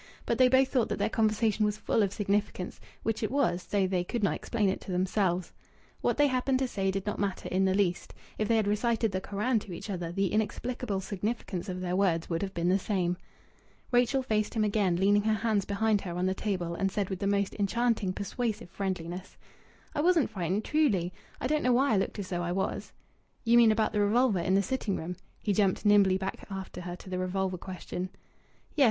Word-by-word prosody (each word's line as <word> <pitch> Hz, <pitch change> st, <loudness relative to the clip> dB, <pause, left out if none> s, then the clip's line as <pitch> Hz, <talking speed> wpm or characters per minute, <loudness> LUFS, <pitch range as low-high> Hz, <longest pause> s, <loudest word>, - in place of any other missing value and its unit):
But -, -, 0 dB
they 255 Hz, -1 st, +7 dB
both 260 Hz, +1 st, +4 dB
thought 250 Hz, -5 st, +1 dB
that -, -, -1 dB
their -, -, 0 dB
conversation 215 Hz, -1 st, +2 dB
was 210 Hz, 0 st, +1 dB
full 220 Hz, -, +1 dB
of 200 Hz, -2 st, +1 dB
significance; 200 Hz, -2 st, -1 dB, 0.2 s
which 225 Hz, -1 st, -1 dB
it 215 Hz, -, 0 dB
was, 225 Hz, -9 st, +1 dB
though 200 Hz, -2 st, +2 dB
they 185 Hz, -1 st, 0 dB
could 230 Hz, +4 st, -3 dB
not 200 Hz, -, +3 dB
explain 220 Hz, -4 st, -1 dB
it 190 Hz, -, -1 dB
to -, -, -7 dB
themselves. 185 Hz, -1 st, 0 dB, 0.5 s
What -, -, +1 dB
they 290 Hz, -, +5 dB
happened 260 Hz, -1 st, +1 dB
to 265 Hz, 0 st, 0 dB
say 195 Hz, -5 st, -1 dB
did 195 Hz, 0 st, -2 dB
not 210 Hz, -, -2 dB
matter 200 Hz, -2 st, -2 dB
in 190 Hz, +1 st, +2 dB
the 190 Hz, 0 st, +2 dB
least. 185 Hz, -3 st, 0 dB, 0.2 s
If 215 Hz, -, +1 dB
they 230 Hz, -, +3 dB
had 220 Hz, -2 st, +2 dB
recited 225 Hz, +1 st, +1 dB
the 185 Hz, 0 st, -2 dB
Koran 215 Hz, +5 st, 0 dB
to 200 Hz, -3 st, -9 dB
each 185 Hz, +5 st, -6 dB
other 175 Hz, -3 st, -3 dB
the 195 Hz, +2 st, 0 dB
inexplicable 220 Hz, -1 st, -1 dB
significance 200 Hz, -1 st, -3 dB
of 185 Hz, 0 st, -4 dB
their 180 Hz, 0 st, -1 dB
words 175 Hz, -4 st, +1 dB
would 165 Hz, -, 0 dB
have 195 Hz, -1 st, -4 dB
been 170 Hz, 0 st, 0 dB
the 190 Hz, +2 st, +3 dB
same. 180 Hz, -3 st, 0 dB, 0.8 s
Rachel 245 Hz, +2 st, +3 dB
faced 215 Hz, -3 st, 0 dB
him 220 Hz, -, +2 dB
again, 200 Hz, -4 st, +2 dB
leaning 200 Hz, +3 st, +4 dB
her 215 Hz, +1 st, +2 dB
hands 215 Hz, -2 st, 0 dB
behind 205 Hz, 0 st, +1 dB
her 175 Hz, -2 st, -5 dB
on 180 Hz, -, 0 dB
the 190 Hz, -, +2 dB
table, 185 Hz, -4 st, -2 dB
and 195 Hz, +3 st, 0 dB
said 200 Hz, -1 st, -2 dB
with 190 Hz, -, -3 dB
the 200 Hz, -, -1 dB
most 200 Hz, -1 st, +1 dB
enchanting, 220 Hz, -1 st, +1 dB
persuasive 205 Hz, 0 st, -3 dB
friendliness 185 Hz, -2 st, -4 dB, 0.6 s
"I 295 Hz, -, 0 dB
wasn't 335 Hz, -7 st, +3 dB
frightened 190 Hz, +1 st, -1 dB
truly! 205 Hz, -, +2 dB, 0.3 s
I -, -, -3 dB
don't 305 Hz, +3 st, +1 dB
know 250 Hz, -, +3 dB
why 265 Hz, 0 st, +3 dB
I -, -, +4 dB
looked 195 Hz, -, -1 dB
as 200 Hz, -2 st, -5 dB
though 175 Hz, -1 st, -1 dB
I 175 Hz, 0 st, -1 dB
was." 190 Hz, +1 st, -2 dB, 0.5 s
"You 235 Hz, 0 st, +4 dB
mean 235 Hz, -2 st, +7 dB
about 215 Hz, 0 st, +1 dB
the 210 Hz, -, +2 dB
revolver 215 Hz, 0 st, +3 dB
in 185 Hz, +3 st, +1 dB
the 200 Hz, -, +3 dB
sitting 210 Hz, -2 st, -1 dB
room?" 175 Hz, +3 st, -4 dB, 0.3 s
He 205 Hz, -, +1 dB
jumped 195 Hz, 0 st, +1 dB
nimbly 200 Hz, -2 st, +5 dB
back 190 Hz, 0 st, -5 dB
after 190 Hz, -2 st, -6 dB
her 175 Hz, 0 st, -5 dB
to 180 Hz, -, -12 dB
the 185 Hz, -, -1 dB
revolver 185 Hz, 0 st, -1 dB
question. 185 Hz, 0 st, -5 dB, 0.7 s
"Yes. -, -, -4 dB
200 Hz, 220 wpm, -29 LUFS, 185-220 Hz, 0.8 s, they